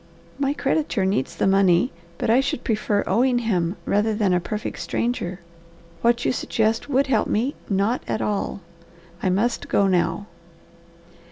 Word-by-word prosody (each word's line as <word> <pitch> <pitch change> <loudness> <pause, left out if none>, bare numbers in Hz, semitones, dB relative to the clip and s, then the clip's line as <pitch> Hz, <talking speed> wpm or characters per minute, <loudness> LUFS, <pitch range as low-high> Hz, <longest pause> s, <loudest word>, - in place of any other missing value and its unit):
"My 280 0 0
creditor 275 -9 0
needs 180 -4 -1
the - - 0
money, 195 +3 +4 0.3
but - - -2
I 240 - +5
should 270 -2 -1
prefer 215 -2 0
owing 245 +6 +2
him 190 -7 0
rather 210 +2 +1
than 205 -4 +2
a 180 - +3
perfect 210 +4 -5
stranger. 185 -7 -2 0.6
What 235 +1 +2
you - - +3
suggest 225 +1 0
would 275 0 +3
help 230 -6 +1
me 250 +7 0 0.2
not 200 +5 +1
at - - -1
all. 205 -1 -2 0.6
I 185 - +1
must 220 +6 0
go 200 - +3
now." 180 0 +1
215 Hz, 155 wpm, -23 LUFS, 190-240 Hz, 0.6 s, I